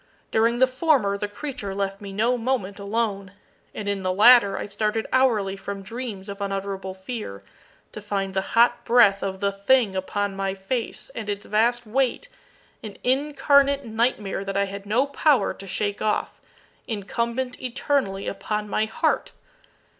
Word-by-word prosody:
During 230 +2 +3
the 260 - +6
former 260 -6 +2
the 205 +1 -3
creature 205 -4 -6
left 195 0 -2
me 200 -1 -7
no 225 +5 +1
moment 230 -5 -2
alone; 200 -2 -2 0.4
and 205 - -6
in 200 -1 -1
the 185 0 0
latter 205 0 +6
I - - -3
started 215 +2 -1
hourly 220 -7 +2
from 195 0 -6
dreams 220 -2 -6
of 200 0 -7
unutterable 195 -1 -3
fear, 190 - -6 0.5
to 215 - -8
find 195 -2 -2
the 190 - +1 0.2
hot 240 +1 +5
breath 220 -5 +5
of 190 -1 -4
the 200 0 +2
thing 200 +1 +2
upon 200 +1 -2
my 195 0 -2
face, 225 +5 -4
and 215 -2 -6
its 205 +1 -3
vast 235 +3 +1
weight 265 - 0 0.5
an 210 -3 -8
incarnate 280 +1 +3
nightmare 220 -4 -1
that 195 0 -3
I 200 - +3
had 200 +1 -8
no 240 +6 +2
power 280 -4 +2
to 195 - -11
shake 205 +2 -2
off 215 -1 -1 0.5
incumbent 235 +4 -3
eternally 250 -5 -1
upon 210 +2 -3
my 215 +1 +1
heart! 315 +9 -1
210 Hz, 160 wpm, -24 LUFS, 195-245 Hz, 0.5 s, the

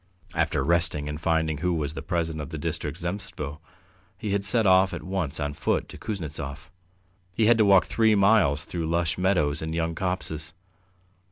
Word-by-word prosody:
After - - 0
resting 85 -4 +2
and 75 +1 -5
finding 80 -2 +1
who 90 +1 0
was 75 -2 -2
the - - -6
president 80 -2 -2
of 70 - -7
the - - -5
District 75 +2 -3
Zemstvo, 85 -5 -5 0.6
he 105 - -4
had 100 0 0
set 110 +2 +2
off 95 0 +4
at - - -7
once 95 -7 -2
on 75 -1 -2
foot - - -1
to - - -10
Kuznetsov. 80 -5 -6 0.6
He 110 - +3
had 115 +1 +5
to 110 - +5
walk 100 -2 +6
three 110 -2 +3
miles 95 -7 +3
through 85 -2 -3
lush 85 0 0
meadows 80 -6 +1
and 80 +1 -3
young 85 0 -1
copses. 80 -4 -3
85 Hz, 180 wpm, -26 LUFS, 75-95 Hz, 0.6 s, walk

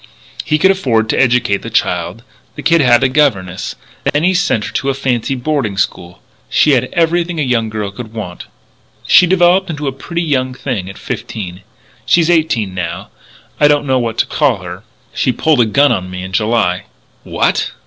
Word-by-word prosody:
"He 150 - +1
could 190 +5 +4
afford 115 - 0
to - - +1
educate 125 -5 +2
the 115 - -7
child. 90 -1 -1 0.3
The - - -8
kid 170 -1 +4
had 120 -2 +4
a - - +5
governess. 125 -11 0 0.3
Then 145 +2 0
he 185 +2 +3
sent 175 - 0
her - - -6
to 140 - -1
a 135 - 0
fancy 135 -1 -1
boarding 125 -6 -2
school. 90 -2 -3 0.3
She 150 - +3
had 125 -2 +2
everything 170 0 0
a - - +1
young 115 -4 0
girl 105 -2 -4
could 110 +2 -9
want. 100 -6 -7 0.6
"She 180 - +6
developed 185 +1 +3
into 150 -3 -4
a - - 0
pretty 170 +6 -4
young 130 -5 -1
thing 120 -8 -4
at 95 - -10
fifteen.... 95 -4 -6 0.4
She's 170 0 +3
eighteen 130 - +1
now 90 -3 -5 0.5
and - - +4
I - - +8
don't 145 0 +2
know 130 -2 +1
what 115 -2 -3
to - - +2
call 130 -11 0
her. 90 +1 -8 0.3
She 130 - +1
pulled 150 0 +2
a 115 - +2
gun 140 +6 +3
on 90 -1 -2
me 90 0 -6
in 95 - -7
July." 100 -3 0 0.4
"What!" - - -1
125 Hz, 195 wpm, -15 LUFS, 105-150 Hz, 0.6 s, I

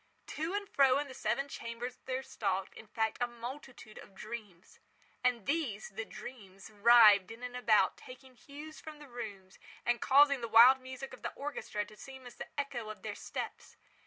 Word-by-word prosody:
To 325 +5 -3
and 410 0 -2
fro 270 -6 +4
in 290 0 -2
the 265 - -9
seven 275 +2 -1
chambers 240 -1 -6
there 260 0 -2
stalked, 195 -6 -2
in 220 - -12
fact, 220 +1 -1
a 245 - +2
multitude 240 -1 -9
of 195 - -14
dreams. 210 -4 -9 0.4
And 245 -4 +1
these—the 225 -8 -2
dreams—writhed 205 -1 +4
in 225 +2 -10
and 250 0 -5
about 215 -6 +3
taking 255 +1 -13
hue 295 +5 -10
from 310 -1 -10
the 295 -1 -13
rooms, 205 -6 -8 0.3
and 240 0 +1
causing 280 -1 +5
the 230 - -3
wild 245 +4 +8
music 260 +1 -8
of 255 - -11
the - - -3
orchestra 270 -7 -4
to 215 - -15
seem 265 +3 -11
as 245 - -10
the - - -7
echo 245 -6 -3
of 215 - -9
their 215 - -4
steps. - - -7
240 Hz, 180 wpm, -33 LUFS, 215-270 Hz, 0.4 s, wild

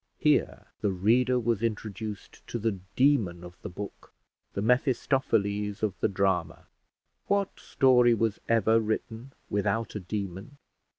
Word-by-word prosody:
Here - - +1 0.2
the 105 - +1
reader 120 +7 +3
was 115 -3 0
introduced 110 -2 -5
to - - -3
the 110 -3 -1 0.2
demon 110 -11 +2
of 90 0 -12
the 105 - -6
book, 100 +2 -8 0.4
the 100 - -2
Mephistopheles 115 -5 +1
of 105 -3 +1
the - - +2
drama. 95 -4 -1 0.6
What 200 -1 0
story 125 -3 +4
was 115 -1 0
ever 115 0 +4
written 110 +3 -3 0.2
without 105 +2 0
a 105 - -3
demon? 100 +5 -5
110 Hz, 130 wpm, -28 LUFS, 100-120 Hz, 0.6 s, story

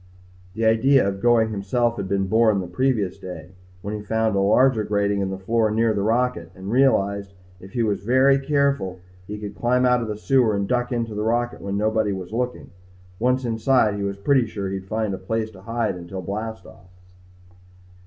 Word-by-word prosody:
The 115 0 -1
idea 120 +2 +4
of 95 0 -3
going 115 -2 +3
himself 115 +4 0
had 95 - -3
been 100 0 +1
born 110 +1 +3
the 95 - -3
previous 100 0 -1
day 90 -3 -9 0.3
when 105 +1 -4
he 105 - -4
found 110 0 0
a - - +2
larger 110 +3 +3
grating 100 -1 0
in 95 - -1
the 95 - -4
floor 110 +3 +1
near 110 +1 +2
the 100 - -1
rocket 110 -6 0
and 95 +2 -7
realized 100 -6 +2 0.3
if 95 +1 -13
he 120 - 0
was 105 -2 -1
very 130 +5 +4
careful 140 -9 0 0.3
he 105 - -5
could 105 -1 -7
climb 125 +6 +1
out 125 -1 +3
of 115 - -3
the 105 -1 -4
sewer 120 -2 +2
and 100 -1 -1
duck 125 +2 0
into 115 -2 -2
the 105 - -3
rocket 120 +2 -1
when 100 0 -3
nobody 110 -1 +1
was 95 +1 -7
looking. 125 +1 -3 0.5
Once 125 +2 +1
inside 115 -1 +2
he 100 - -4
was 100 0 -3
pretty 125 +3 +2
sure 100 -3 -4
he'd 95 -1 -5
find 110 -1 -1
a 95 - -5
place 110 +3 -3
to 95 -3 -14
hide 115 +1 -2
until 90 +1 -7
blast 110 +5 -5
off. 90 - -16
110 Hz, 205 wpm, -23 LUFS, 100-120 Hz, 0.5 s, idea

